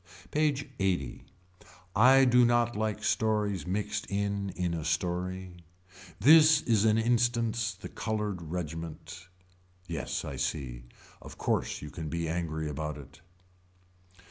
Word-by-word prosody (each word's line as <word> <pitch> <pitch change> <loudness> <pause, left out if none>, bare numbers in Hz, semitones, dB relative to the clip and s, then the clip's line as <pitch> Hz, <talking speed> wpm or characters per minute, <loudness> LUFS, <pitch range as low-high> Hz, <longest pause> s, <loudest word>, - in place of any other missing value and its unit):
PAGE 150 -2 +1
LXXX. 90 -10 -1 0.7
I 130 +5 +7
do 125 0 +5
not 120 0 +2
like 105 0 -2
stories 105 -4 0
mixed 100 +3 -2
in 100 0 -2
in 90 -1 -1
a 80 -2 -3
story. 90 +2 -2 0.6
This 155 +5 +7
is 110 -3 +2
an 110 0 +4
instance 115 -1 +1
the 95 - -9
colored 105 -4 -3
regiment. 80 +1 -6 0.6
Yes 85 -5 -3
I 70 - -6
see. 65 -3 -3 0.4
Of - - -11
course - - -1
you 75 - -7
can 80 -3 -6
be 85 +1 -2
angry 80 -2 -2
about 75 0 -4
it. 70 +3 -13
95 Hz, 125 wpm, -29 LUFS, 80-115 Hz, 0.7 s, I